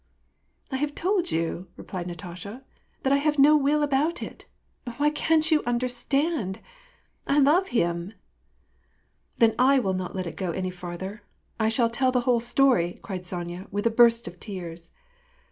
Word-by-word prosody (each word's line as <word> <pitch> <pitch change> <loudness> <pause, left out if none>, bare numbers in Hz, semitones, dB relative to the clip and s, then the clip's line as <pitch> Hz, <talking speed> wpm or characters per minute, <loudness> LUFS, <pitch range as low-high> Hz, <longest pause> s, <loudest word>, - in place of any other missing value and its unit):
" - - -38
I 265 - -1
have 290 +1 -2
told 370 0 0
you," 165 +3 -2
replied 180 -2 -6
Natasha, 180 +8 -8 0.2
" - - -40
that 270 - +3
I - - +5
have 295 +1 +1
no 290 +2 +7
will 295 +1 +2
about 295 +4 +1
it! - - -10 0.5
Why 295 +1 +3
can't 315 +1 +2
you 310 - +4
understand? 250 - -1 0.7
I 280 - +2
love 305 +7 +4
him! 170 -3 -1 0.4
" - - -41
" - - -44
Then 225 -1 +4
I 270 +2 +5
will 195 -7 +1
not 185 0 -4
let 185 -1 -2
it 170 - -6
go 180 -3 -2
any 185 +1 -3
farther. 180 +3 -7 0.4
I 220 0 +2
shall 230 0 +1
tell 255 +2 +2
the 250 -1 +1
whole 245 -1 +2
story," 240 -7 +2
cried 185 -2 -6
Sonya, 175 +1 -5
with 205 +2 -3
a 230 - +3
burst 235 0 +4
of 175 - -9
tears. 175 -5 -7
230 Hz, 180 wpm, -26 LUFS, 185-280 Hz, 0.7 s, no